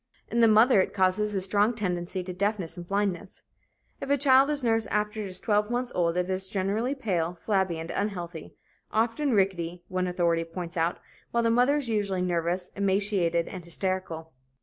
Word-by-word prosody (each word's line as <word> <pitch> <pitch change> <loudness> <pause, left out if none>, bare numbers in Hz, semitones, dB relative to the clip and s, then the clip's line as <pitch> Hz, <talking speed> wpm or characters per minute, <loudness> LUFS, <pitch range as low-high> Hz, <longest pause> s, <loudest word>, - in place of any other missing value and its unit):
In 235 - 0
the 230 - +6
mother 220 0 +6
it - - -3
causes 200 +2 +1
a 190 - 0
strong 205 +5 +2
tendency 180 -3 -3
to 180 0 -6
deafness 195 -2 -2
and 175 -1 -9
blindness. 195 -1 -2 0.6
If 275 - -6
a 285 - +4
child 270 0 +5
is 290 -3 0
nursed 225 -2 +2
after 210 +1 -1
it 205 - -4
is 185 -1 -2
twelve 210 -1 +1
months 245 +1 -2
old, 170 -1 +1
it 180 0 0
is 190 0 -2
generally 205 +8 -1
pale, 180 -9 -1
flabby 190 -5 0
and 165 +1 -6
unhealthy, 175 -5 -4 0.4
often 230 +6 +1
rickety, 180 -4 0
one 185 0 -1
authority 170 -2 +1
points 170 +1 -7
out, 165 +1 0 0.3
while 235 0 0
the 230 - +3
mother 250 +5 +3
is 285 -4 -3
usually 200 -4 0
nervous, 175 +1 -1
emaciated 195 -4 +1
and 185 -3 -7
hysterical. 170 -2 -3
190 Hz, 185 wpm, -27 LUFS, 175-220 Hz, 0.6 s, the